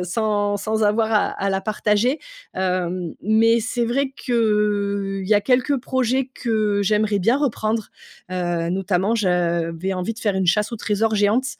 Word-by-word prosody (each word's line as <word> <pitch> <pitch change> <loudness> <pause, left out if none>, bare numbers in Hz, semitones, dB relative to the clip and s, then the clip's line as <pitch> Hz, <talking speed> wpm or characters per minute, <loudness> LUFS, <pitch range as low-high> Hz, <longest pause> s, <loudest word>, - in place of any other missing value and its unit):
sans 205 +1 0
sans 220 +2 -2
avoir 220 +2 +2
à 210 - +3
à 195 - -2
la 195 0 0
partager. 215 +6 0 0.4
Hem. 180 -2 -2
Mais 225 +2 +3
c'est 240 +1 -1
vrai 265 +3 0
qu'il 205 -4 0
y 210 - +1
a 205 - +4
quelques 260 +4 +1
projets 260 +1 0
que 215 -4 0
j'aimerais 210 0 +1
bien 230 +8 +3
reprendre. 225 -6 -1 0.4
Heu, 175 -2 -1
notamment, 190 +3 0
j'avais 175 -3 0
envie 185 +5 -3
de 225 - -13
faire 205 -3 0
une 190 -1 0
chasse 210 +6 +2
aux - - -3
trésors 215 +1 0
géante. 215 +5 +2
210 Hz, 160 wpm, -21 LUFS, 190-225 Hz, 0.4 s, a